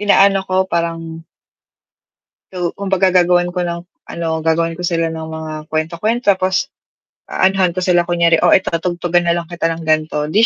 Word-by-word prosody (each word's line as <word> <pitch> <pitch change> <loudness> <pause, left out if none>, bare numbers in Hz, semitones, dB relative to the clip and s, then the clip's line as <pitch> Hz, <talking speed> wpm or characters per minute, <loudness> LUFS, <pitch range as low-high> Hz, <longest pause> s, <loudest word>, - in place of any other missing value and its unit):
inaano 200 -1 +4
ko 185 0 +1
parang 165 -2 -4 1.3
so, 175 -2 -3
kumbaga 190 -2 +1
gagawan 175 0 +3
ko 180 - -1
ng 170 0 -3 0.3
ano, 170 -1 -4
gagawan 165 +1 +1
ko 180 - -8
sila 165 -1 0
ng 160 -1 -5
mga 160 0 -6 0.2
kwento-kwento, 185 +8 0
tapos 185 0 0 0.6
aanuhan 190 -2 +1
ko 185 - -3
sila 175 -1 +2
kunyari, 170 -1 +3
"Oh, - - +5
eto 190 - +3
tugtugan 175 0 0
na 170 - +3
lang 170 0 -4
kita 170 -1 -3
ng 165 - -8
ganto," 155 -1 0
di 215 +7 +4
175 Hz, 165 wpm, -17 LUFS, 165-185 Hz, 1.3 s, Oh